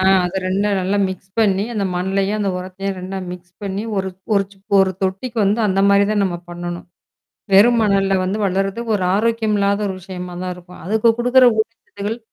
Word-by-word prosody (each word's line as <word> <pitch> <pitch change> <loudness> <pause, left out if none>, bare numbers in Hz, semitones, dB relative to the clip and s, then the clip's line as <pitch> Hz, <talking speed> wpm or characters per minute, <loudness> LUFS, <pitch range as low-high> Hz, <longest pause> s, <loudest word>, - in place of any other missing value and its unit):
அ - - +1 0.2
அதை 185 +2 -2
2ம் 200 +1 +1
நல்லா 195 +2 0
மிக்ஸ் 190 +1 -8
பண்ணி 200 -2 +3
அந்த 200 -2 -1
மண்ணையும் 195 +3 0
உரத்தையும் 190 0 -5
மிக்ஸ் 180 0 -12
பண்ணி 200 +1 -3
ஒரு 190 0 -1 0.3
ஒரு 200 0 +3 0.3
ஒரு 190 -1 +4
தொட்டிக்கு 210 +6 -2
வந்து 210 +4 +2
அந்த 190 +1 +1
மாதிரி 200 0 +5
தான் 205 - +2
நம்ம 175 -2 -2
பண்ணணும். 175 0 -6 0.7
வெறும் 230 +4 +6
மணல்ல 195 -2 +2
வந்து 195 +4 -1
வளர்றது 195 +4 -1
ஒரு 195 - -1
ஆரோக்கியமில்லாத 210 -2 +1
ஒரு 190 - -3
விஷயமா 180 -1 -7
தான் 180 0 -3
இருக்கும். 180 0 -14
அதுக்கு 220 +4 +2
குடுக்கற 250 +1 +5
ஊட்டச்சத்துக்கள் 220 0 -4
195 Hz, 165 wpm, -19 LUFS, 185-210 Hz, 0.7 s, வெறும்